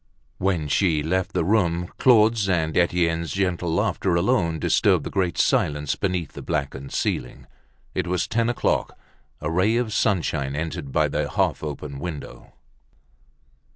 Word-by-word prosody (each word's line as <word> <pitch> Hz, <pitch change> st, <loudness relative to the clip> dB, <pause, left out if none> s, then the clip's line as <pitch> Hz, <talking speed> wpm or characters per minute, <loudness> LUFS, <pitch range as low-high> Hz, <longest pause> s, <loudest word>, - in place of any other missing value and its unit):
When 90 Hz, -6 st, 0 dB
she 80 Hz, -1 st, +2 dB
left 95 Hz, +4 st, -1 dB
the 90 Hz, -3 st, 0 dB
room, 90 Hz, -4 st, +1 dB
Claude's 110 Hz, -4 st, +4 dB
and 80 Hz, -4 st, 0 dB
Etienne's 85 Hz, -1 st, +1 dB
gentle 90 Hz, -3 st, -1 dB
laughter 85 Hz, +2 st, 0 dB
alone 85 Hz, -3 st, +1 dB
disturbed -, -, +2 dB
the -, -, -6 dB
great 95 Hz, -4 st, 0 dB
silence 75 Hz, 0 st, +1 dB
beneath 90 Hz, -5 st, -2 dB
the -, -, -8 dB
blackened 70 Hz, -2 st, -3 dB
ceiling. -, -, -2 dB, 0.5 s
It 95 Hz, -2 st, -2 dB
was 90 Hz, 0 st, 0 dB
ten 115 Hz, 0 st, +1 dB
o'clock. 120 Hz, -, -1 dB, 0.4 s
A 75 Hz, +1 st, -2 dB
ray 95 Hz, +7 st, +2 dB
of 120 Hz, -3 st, -1 dB
sunshine 80 Hz, -10 st, 0 dB
entered 80 Hz, -2 st, -4 dB
by -, -, +2 dB
the -, -, -2 dB
half -, -, 0 dB
open 75 Hz, -2 st, -5 dB
window. 75 Hz, -7 st, -7 dB
85 Hz, 145 wpm, -24 LUFS, 80-95 Hz, 0.5 s, Claude's